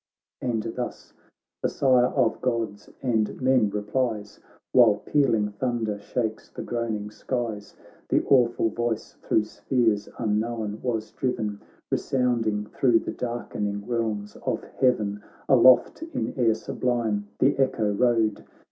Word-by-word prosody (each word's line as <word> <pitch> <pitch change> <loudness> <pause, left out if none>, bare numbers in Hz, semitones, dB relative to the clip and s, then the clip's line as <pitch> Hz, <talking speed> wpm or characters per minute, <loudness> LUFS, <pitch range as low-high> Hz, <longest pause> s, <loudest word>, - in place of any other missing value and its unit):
And 115 -4 -1
thus 120 +1 -5 0.5
the - - +1
Sire 125 -2 +4
of - - +1
Gods 115 -5 -2
and 110 -5 0
men 130 -5 +3
replies. 105 0 -2 0.3
While - - +6
pealing 115 -8 +1
thunder 110 -2 -2
shakes 110 +1 -3
the - - -7
groan 115 -2 -2
ing 105 0 -6
skies; 115 -4 -4 0.3
The - - +3
awful 120 -4 +3
voice 120 0 -3
thro' 110 - +2
spheres 110 -2 0
unknown 110 -1 -1
was 110 -3 -2
driven. 105 -5 -2 0.3
Resounding 115 -5 0
thro' 120 +2 +3
the - - -2
dark'ning 105 -4 -3
realms 110 -4 -2
of - - -3
heaven; 105 -6 0 0.3
Aloft 130 - +6
in 325 0 -3
air 115 -5 +3
sublime 110 -3 -1
the 135 - +3
echo 110 -6 +1
rode. 115 -2 +2
115 Hz, 125 wpm, -26 LUFS, 105-125 Hz, 0.5 s, While